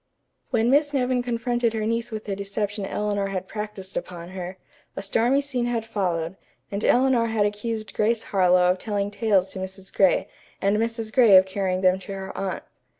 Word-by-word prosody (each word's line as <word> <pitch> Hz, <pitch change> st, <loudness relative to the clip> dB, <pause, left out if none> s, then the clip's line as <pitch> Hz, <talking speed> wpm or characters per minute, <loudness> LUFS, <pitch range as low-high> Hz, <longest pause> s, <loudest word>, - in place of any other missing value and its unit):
When 230 Hz, +2 st, +2 dB
Miss 290 Hz, +1 st, +3 dB
Nevin 250 Hz, -1 st, +1 dB
confronted 240 Hz, -1 st, 0 dB
her 220 Hz, -1 st, -1 dB
niece 230 Hz, +1 st, -1 dB
with 220 Hz, -2 st, -6 dB
the 200 Hz, -, -2 dB
deception 200 Hz, 0 st, -3 dB
Eleanor 205 Hz, -1 st, -1 dB
had 190 Hz, -1 st, -4 dB
practised 210 Hz, -3 st, -6 dB
upon 175 Hz, -1 st, -5 dB
her, 185 Hz, 0 st, -6 dB, 0.4 s
a -, -, -4 dB
stormy 235 Hz, +7 st, +2 dB
scene 255 Hz, -4 st, -2 dB
had 230 Hz, -2 st, -1 dB
followed, 185 Hz, -5 st, -2 dB, 0.3 s
and 200 Hz, +2 st, -3 dB
Eleanor 250 Hz, -2 st, +4 dB
had 220 Hz, -2 st, +1 dB
accused 215 Hz, +1 st, -3 dB
Grace 225 Hz, +1 st, +1 dB
Harlowe 180 Hz, -2 st, +4 dB
of 185 Hz, -, -2 dB
telling 205 Hz, -2 st, -2 dB
tales 200 Hz, -4 st, +2 dB
to 190 Hz, -, -6 dB
Mrs. 190 Hz, +1 st, -8 dB
Gray, 190 Hz, -2 st, +3 dB, 0.3 s
and 200 Hz, +1 st, +2 dB
Mrs. 225 Hz, 0 st, -2 dB
Gray 235 Hz, -7 st, +7 dB
of 185 Hz, -, +6 dB
carrying 190 Hz, -1 st, -1 dB
them 185 Hz, 0 st, +4 dB
to 195 Hz, +1 st, -8 dB
her 190 Hz, 0 st, -6 dB
aunt. 195 Hz, -1 st, -3 dB
205 Hz, 185 wpm, -24 LUFS, 190-230 Hz, 0.4 s, Gray